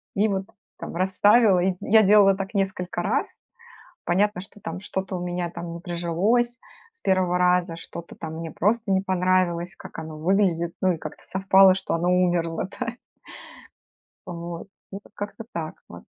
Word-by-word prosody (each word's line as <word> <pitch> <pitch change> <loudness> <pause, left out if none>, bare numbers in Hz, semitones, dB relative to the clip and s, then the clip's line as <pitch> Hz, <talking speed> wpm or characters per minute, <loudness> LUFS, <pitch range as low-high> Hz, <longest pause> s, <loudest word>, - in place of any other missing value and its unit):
и 205 +2 +3
вот 195 -2 -2 0.3
там - - -7
расставила. 195 +3 +4
И 190 +2 +2
д - - -8
я 220 +1 +5
делала 200 -1 +6
так 195 +2 -5
несколько 190 -3 -1
раз. 275 - -1 0.7
Понятно, 200 +2 +1
что 195 +2 -13
там 165 -1 -6
что-то 190 -1 -4
у - - -4
меня 175 0 -2
там 170 0 -7
не 170 - -7
прижилось 190 +8 0 0.3
с 460 - -16
1 185 -2 +2
раза, 180 -1 +2
что-то 170 0 -9
там 160 -1 -6
мне 165 0 -6
просто 215 +5 0
не 190 - +3
понравилось, 185 -2 0
как - - -11
оно 160 -1 -8
выглядит, 170 -1 +1
ну 185 -1 +4
и - - -7
как-то - - -9
совпало 190 0 +5
что - - -2
оно 170 +1 0
умерло, 175 -1 +1
да. 230 - -2 1.3
Вот, 170 +1 -7 0.2
ну 195 - -7
вот - - -20
как-то 205 +2 -6
так 160 -2 -4
вот. 85 0 -11
185 Hz, 170 wpm, -24 LUFS, 170-195 Hz, 1.3 s, делала